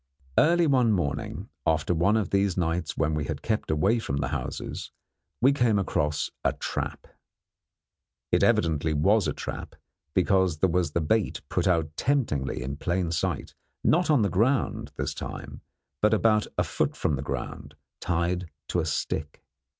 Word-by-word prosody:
Early 170 +2 +4
one 130 -6 +4
morning, 85 -8 -2
after 80 +2 +1
one 95 +6 +3
of 105 -5 -1
these 100 -2 +2
nights 85 -1 -1
when 80 0 +1
we 75 -1 -1
had - - -5
kept 110 -2 -1
away 95 +10 +2
from 70 -11 -3
the 70 -2 -1
houses, - - -4 0.5
we 135 +3 +5
came 120 -6 +3
across 75 -6 0
a - - +2
trap. - - -4 1.3
It - - +3
evidently 80 -1 +2
was 100 +7 +3
a - - 0
trap, - - -6 0.4
because 95 -3 +3
there 90 +3 +2
was 85 -4 0
the 85 - +1
bait 105 +7 0
put - - 0
out 80 -4 +1
temptingly 110 - 0
in 70 +2 -4
plain 85 +1 -1
sight, 85 - -2 0.3
not 175 +2 +3
on 145 -8 +4
the 100 - +2
ground 120 +8 +1
this - - -2
time, - - -7 0.4
but 105 +1 +4
about 105 -1 +3
a - - +3
foot - - -1
from 75 - +1
the 65 - -4
ground, 70 - -5 0.2
tied 85 0 -1 0.2
to 90 - +1
a 80 - -1
stick. 75 +1 -3
90 Hz, 165 wpm, -27 LUFS, 80-110 Hz, 1.3 s, we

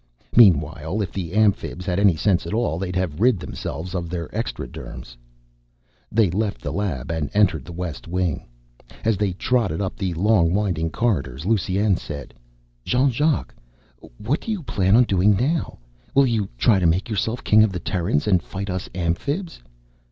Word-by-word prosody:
Meanwhile, 85 -2 +4
if 90 - -5
the 90 -3 -5
Amphibs 100 -4 +1
had 90 0 0
any 100 -4 +5
sense 90 +1 +1
at 100 - -2
all, 100 -9 0
they'd 90 -1 -4
have 90 -4 -2
rid 125 -2 +4
themselves 90 +2 -6
of 85 -2 -3
their 85 -2 -4
extraderms. - - -6 1.0
They 110 -5 +3
left 105 +2 -1
the - - -3
lab 80 -9 -2
and 80 -3 -2
entered 80 -10 +3
the - - -9
west 85 -7 -6
wing. 90 -3 -2 0.6
As 110 -1 +3
they 100 -1 -1
trotted 105 -4 0
up 95 -2 -2
the 90 -3 -3
long 90 -2 +3
winding 90 -6 0
corridors 80 - -1
Lusine 100 -1 +1
said, 70 -4 -8 0.5
"Jean 130 - +2
Jacques, 150 +5 0 0.6
what 130 +9 -1
do - - -8
you 200 -6 -3
plan 95 -6 +2
on 125 - +7
doing 100 -1 +3
now? 145 - -1 0.4
Will 140 0 +6
you 115 -5 0
try 100 - +4
to 90 - +2
make 85 +4 +1
yourself 110 +2 -2
King 110 0 +5
of 110 - +2
the 90 - -4
Terrans 85 -5 -1
and 95 -5 +3
fight 100 +2 -5
us 95 0 -4
Amphibs?" 140 - -2
95 Hz, 175 wpm, -22 LUFS, 85-110 Hz, 1.0 s, on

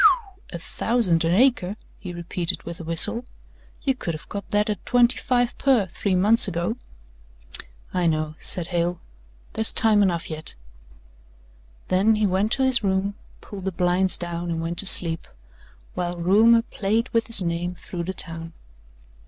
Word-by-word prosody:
"A 175 - -6
thousand 180 -1 0
an 165 - +1
acre?" 220 -5 +1 0.2
he 180 - -8
repeated 175 +1 -2
with 170 0 -9
a - - -8
whistle. 165 +8 +3 0.6
"You 270 - +1
could 175 -10 -5
have 155 - -12
got 200 -1 -7
that 210 0 0
at 210 -1 -4
twenty 245 0 +3
five 245 -1 -1
per 260 -7 +2
three 190 +1 -3
months 210 +5 +4
ago." 175 +4 -3 1.2
"I 180 -2 0
know," 155 -1 -2
said 175 -3 +1
Hale, 175 0 -2 0.5
"there's 220 0 +1
time 215 -2 +2
enough 175 -4 -1
yet." 155 -1 -4 1.3
Then 200 +4 +2
he 215 0 0
went 195 +3 0
to 270 - 0
his 255 -3 +3
room, 195 +1 -1 0.3
pulled 195 -2 -10
the 190 - -2
blinds 180 +1 0
down 175 0 -6
and 165 -1 -3
went 165 +1 -3
to 200 - +4
sleep, 165 -3 +7 0.7
while 175 0 -4
rumour 220 +7 +3
played 225 +2 -2
with 230 -1 -1
his 230 -5 +6
name 175 +1 -3
through 175 -1 -7
the 190 - -4
town. 165 0 -5
185 Hz, 160 wpm, -22 LUFS, 170-220 Hz, 1.3 s, sleep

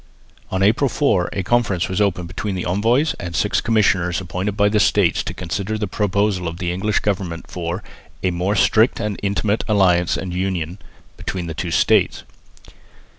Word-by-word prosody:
On 95 +1 0
April 115 +7 +3
4 105 - +1
a 95 - -2
conference 100 -5 +1
was 95 +2 -1
opened 90 -4 0
between 95 +4 -4
the 90 - -3
envoys 115 - +2
and 85 -1 -5
six - - +1
commissioners 95 -6 +2
appointed 95 +3 -3
by 105 0 +4
the 105 +1 +2
States - - +3
to - - -4
consider 95 +4 -3
the 105 - -1
proposals 100 -2 0
of 85 - -8
the 85 -1 -2
English 105 +4 0
Government 95 -5 -2
for 90 +2 -4 0.4
"a 95 - +2
more 90 +4 -1
strict 110 +5 +3
and 105 -3 -3
intimate 100 +2 0
alliance 90 -5 +3
and 95 -2 -5
union" 90 -1 -2 0.4
between 90 -2 -4
the 80 - -5
two 85 +3 -4
states. - - +2
95 Hz, 175 wpm, -20 LUFS, 90-105 Hz, 0.4 s, by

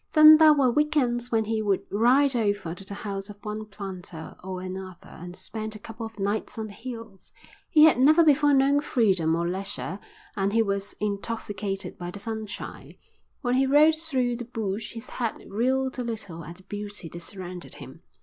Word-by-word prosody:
Then 310 0 +10
there 315 -1 +8
were 265 -4 +3
week 300 +4 +1
ends 240 -2 +1
when 220 -1 +2
he 220 0 -1
would 200 -3 +1
ride 255 +6 +4
over 205 -7 0
to 195 - -11
the 200 +1 -6
house 200 -1 -5
of 205 - -10
one 215 0 -4
planter 185 -5 -8
or 185 0 -5
another 185 -1 -7
and 175 +1 -10
spend 215 +3 -6
a - - -6
couple 225 +2 -7
of 225 - -17
nights 205 +3 -2
on 220 - -3
the 210 - -9
hills. 225 -5 -9 0.4
He 305 - +6
had 310 -5 +6
never 310 +6 +6
before 295 -1 +5
known 275 +1 +4
freedom 190 - +2
or 170 +1 -1
leisure. 190 0 -3 0.4
And 195 +1 0
he 225 0 +4
was 200 -1 -2
intoxicated 205 -1 -3
by 175 0 -5
the 180 - -7
sunshine. 220 0 -6 0.5
When 245 -2 0
he 265 +1 +3
rode 300 +3 +6
through 265 -7 -1
the 240 - -6
bush 220 -3 -4
his 230 +1 -8
head 235 -3 -2
reeled 260 +5 0
a - - -1
little 200 -9 -6
at 170 +3 -9
the 185 - -17
beauty 205 -2 -6
that 170 - -8
surrounded 180 -1 -7
him. - - -11
215 Hz, 195 wpm, -26 LUFS, 195-250 Hz, 0.5 s, Then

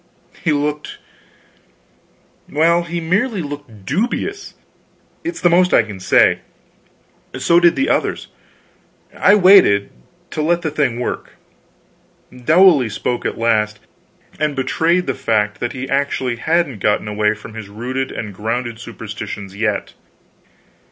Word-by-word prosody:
He 160 - +2
looked 150 0 -2 1.5
well, 165 +3 +3
he 170 0 -4
merely 185 +4 0
looked 145 -9 -9
dubious, 245 - -2 0.7
it's 335 +1 -4
the - - +4
most 180 +1 +4
I - - +5
can 105 -3 -9
say; 95 - +4 1.0
so 170 0 +4
did 175 -1 +4
the 275 - 0
others. - - 0 0.9
I 205 - +5
waited 185 - +5 0.4
to 155 - -2
let 170 +3 +1
the 155 - -1
thing 140 -6 0
work. 125 - -4 1.0
Dowley 155 0 +4
spoke 120 +3 -2
at - - -5
last 110 -2 +1 0.6
and 150 -2 0
betrayed 165 +7 +1
the - - -1
fact 105 -2 0
that 120 - -3
he 130 0 -5
actually 135 -3 -1
hadn't 160 -4 0
gotten 105 +1 0
away 105 0 +1
from 105 +1 -12
his 110 -3 -8
rooted 130 +5 -4
and 105 -3 -6
grounded 115 +3 -3
superstitions 105 -4 -7
yet. 105 -1 -2
135 Hz, 130 wpm, -18 LUFS, 110-170 Hz, 1.5 s, I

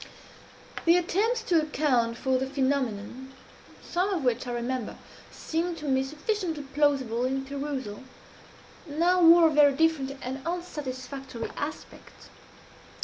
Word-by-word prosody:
The 340 +1 +6
attempts 435 +7 0
to 345 -8 +3
account 260 -7 +1
for 260 0 +1
the 265 - -2
phenomenon 265 -2 -2 0.5
some 360 +3 0
of 365 -7 -1
which, 250 0 0
I - - -3
remember, 240 0 -3 0.3
seemed 335 +1 -3
to 305 - -8
me 265 -2 +2
sufficiently 315 +2 -3
plausible 270 -4 +1
in 270 +1 -1
perusal 275 -6 -5 0.9
now 345 +5 +2
wore 335 0 +8
a - - -3
very 290 -1 +6
different 285 -3 +1
and 265 +2 -4
unsatisfactory 270 -7 -5
aspect. 295 +2 -8
280 Hz, 125 wpm, -27 LUFS, 260-330 Hz, 0.9 s, wore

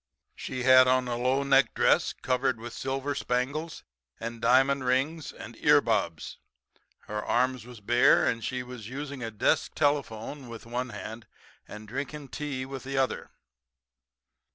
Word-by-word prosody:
"She 125 -1 -5
had 130 0 +7
on 130 0 +2
a 120 - -1
low 130 +3 +1
necked 135 0 +3
dress - - +3
covered 130 -2 -1
with 120 +1 -8
silver 135 +2 -2
spangles, 140 +7 -2 0.4
and 115 0 -6
diamond 135 +3 +4
rings 135 +5 0
and - - -10
ear - - +5
bobs. 80 -2 -2 0.6
Her 105 0 -5
arms 125 -1 0
was 120 -4 -12
bare; 120 +4 +4
and 115 -1 0
she 130 -1 -3
was 125 -3 -9
using 140 0 -6
a 115 - -3
desk 105 -2 0
telephone 140 -3 -1
with 115 -1 -9
one 125 +2 -3
hand, 110 +1 -8 0.4
and 105 0 -10
drinking 140 +4 -5
tea 140 -3 -4
with 135 -1 -7
the 135 0 -4
other. 130 -1 0
130 Hz, 155 wpm, -28 LUFS, 115-135 Hz, 0.6 s, had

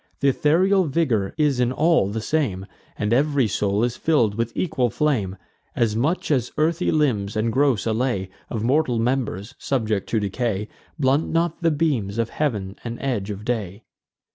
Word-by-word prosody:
Th' - - -24
ethereal 185 +7 +3
vigour 130 -10 0
is 145 -4 +2
in 125 0 +2
all 155 - +3
the 110 +2 -3
same, 110 -9 -1 0.3
And 105 +1 0
every 140 -1 +2
soul 100 +1 0
is 120 0 -1
fill'd 130 -10 +2
with 115 +2 -2
equal 130 -8 +1
flame; 110 -9 0 0.4
As 115 -3 +1
much 150 +9 0
as 125 -5 +1
earthy 165 +3 +1
limbs, 110 -10 +1
and 110 +1 0
gross 135 -5 +2
allay 110 -4 -1 0.2
Of 110 -2 -3
mortal 130 0 +2
members, 115 -4 -1
subject 110 -7 -1
to 110 - +1
decay, 105 0 -2 0.3
Blunt 140 +1 +2
not 165 0 0
the 165 - +3
beams 140 -10 0
of 115 -1 -1
heav'n 105 -10 -2
and 115 0 -5
edge 120 -7 -2
of 105 0 -6
day. 110 -4 -3
120 Hz, 165 wpm, -23 LUFS, 105-150 Hz, 0.4 s, ethereal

